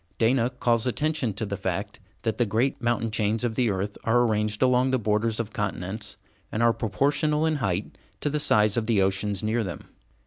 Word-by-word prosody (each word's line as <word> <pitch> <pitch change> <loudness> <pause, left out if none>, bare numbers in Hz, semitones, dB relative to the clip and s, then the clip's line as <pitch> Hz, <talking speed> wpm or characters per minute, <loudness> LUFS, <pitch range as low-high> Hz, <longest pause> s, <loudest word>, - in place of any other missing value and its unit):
Dana 120 +1 +3
calls 120 -2 0
attention 145 -4 0
to 110 - -1
the 100 0 -3
fact 95 +2 -4 0.2
that 110 +1 -1
the 120 - +4
great 115 +7 0
mountain 115 -2 0
chains 110 +1 0
of 120 -2 0
the 120 0 +1
earth 100 +1 -3
are 120 +2 +3
arranged 105 0 0
along 125 0 +3
the 130 - +2
borders 110 0 0
of 115 -2 -4
continents, 100 +1 -3 0.3
and 110 - 0
are 115 0 +5
proportional 145 +7 +1
in 160 -1 +1
height 95 -6 -2 0.2
to 145 - 0
the 150 - 0
size 105 -7 +3
of 110 -2 0
the 115 -4 +3
oceans 95 +1 0
near 110 +2 +1
them. 90 -4 -7
115 Hz, 200 wpm, -26 LUFS, 105-125 Hz, 0.3 s, are